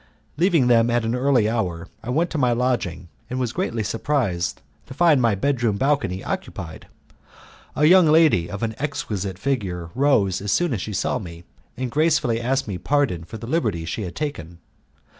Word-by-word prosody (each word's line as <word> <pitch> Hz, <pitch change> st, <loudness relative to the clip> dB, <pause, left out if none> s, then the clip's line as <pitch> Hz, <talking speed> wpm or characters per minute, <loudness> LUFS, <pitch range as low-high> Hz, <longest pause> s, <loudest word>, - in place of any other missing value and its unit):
Leaving 165 Hz, -3 st, +3 dB
them 120 Hz, -1 st, +4 dB
at 120 Hz, -1 st, +1 dB
an 115 Hz, -, 0 dB
early 125 Hz, -3 st, +2 dB
hour, 95 Hz, -7 st, -2 dB
I 115 Hz, -, -8 dB
went 165 Hz, +7 st, 0 dB
to 155 Hz, -, -2 dB
my 125 Hz, -2 st, +3 dB
lodging 115 Hz, -8 st, -1 dB, 0.2 s
and 125 Hz, -, -3 dB
was 120 Hz, -2 st, -2 dB
greatly 115 Hz, -1 st, -2 dB
surprised 110 Hz, -5 st, -1 dB, 0.3 s
to 130 Hz, -, -10 dB
find 160 Hz, -4 st, +4 dB
my 115 Hz, -4 st, +3 dB
bedroom 120 Hz, -2 st, 0 dB
balcony 135 Hz, -8 st, 0 dB
occupied. 80 Hz, -2 st, -6 dB, 0.9 s
A 150 Hz, -, +3 dB
young 180 Hz, +1 st, +7 dB
lady 155 Hz, -, +4 dB
of 100 Hz, +3 st, -5 dB
an 110 Hz, -1 st, -1 dB
exquisite 100 Hz, -9 st, -3 dB
figure 95 Hz, -10 st, -3 dB
rose 115 Hz, -9 st, +2 dB
as 100 Hz, 0 st, -2 dB
soon 175 Hz, -, +1 dB
as 105 Hz, -, -2 dB
she 105 Hz, -, -5 dB
saw 95 Hz, -, -1 dB
me, 85 Hz, -3 st, -9 dB, 0.3 s
and 125 Hz, -1 st, -3 dB
gracefully 145 Hz, -7 st, +2 dB
asked 135 Hz, +2 st, 0 dB
me 95 Hz, -4 st, -4 dB
pardon 135 Hz, -, 0 dB
for 85 Hz, -, -8 dB
the 115 Hz, -, -8 dB
liberty 115 Hz, -, -1 dB
she 80 Hz, -, -4 dB
had 90 Hz, -4 st, -6 dB
taken. 90 Hz, -, -5 dB
120 Hz, 180 wpm, -22 LUFS, 95-140 Hz, 0.9 s, young